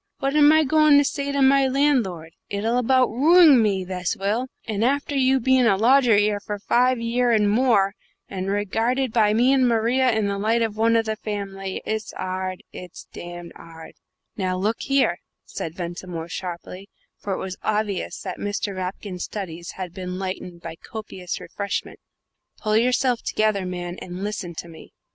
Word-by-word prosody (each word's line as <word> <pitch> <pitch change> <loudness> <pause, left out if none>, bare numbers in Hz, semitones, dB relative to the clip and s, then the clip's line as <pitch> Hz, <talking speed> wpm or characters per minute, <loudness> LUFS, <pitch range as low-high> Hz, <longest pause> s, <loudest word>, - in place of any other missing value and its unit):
What 275 +2 -1
am 295 0 +7
I 315 0 +5
goin' 305 0 +5
to 285 - +5
say 280 0 -2
to 280 -1 +1
my 270 0 +5
landlord? 245 - 0 0.2
It'll 225 +4 0
about 255 +1 +3
ruing 300 +1 +6
me, 200 -3 +1
this 180 +3 -3
will; 215 +6 -1 0.2
and 215 -1 -1
after 280 +3 0
you 265 0 +3
bein' 260 0 +3
a 195 -4 +3
lodger 245 +1 +5
'ere 205 0 +2
for 205 0 -5
five 250 +4 +2
year 240 +1 0
and 215 -2 +3
more, 210 -3 +3 0.3
and 190 -1 -4
regarded 225 +5 0
by 215 -2 +3
me 250 +4 +4
and 260 -2 +3
Maria 240 +3 +2
in 220 -2 0
the 200 0 -2
light 225 +3 +1
of 220 -2 -2
one 225 +1 +2
of 225 -1 +2
the 220 0 -2
family. 195 -3 -5
It's 220 -1 -3
'ard 185 0 -4
it's 180 -2 -10
damned 175 0 -8
'ard!" 165 -1 -12 0.4
"Now, 185 -2 -1
look 210 +4 -1
here," 270 -11 +1 0.3
said 165 0 -6
Ventimore, 175 -1 -6
sharply 180 +2 -7 0.3
for 200 - -3
it - - -2
was 185 -1 -5
obvious 210 -3 -2
that 185 -2 -6
Mr. 205 -1 -3
Rapkin's 185 0 -5
studies 170 -5 -7
had 185 -2 -7
been 180 0 -5
lightened 185 -2 -6
by 165 -1 -7
copious 190 -5 -7
refreshment 200 -1 -5 0.6
"pull 215 -1 -1
yourself 245 +1 +2
together, 215 -3 0
man, 175 0 -5
and 180 +1 -7
listen 205 -5 -4
to 170 - -7
me." 160 -1 -14
210 Hz, 175 wpm, -23 LUFS, 185-250 Hz, 0.6 s, am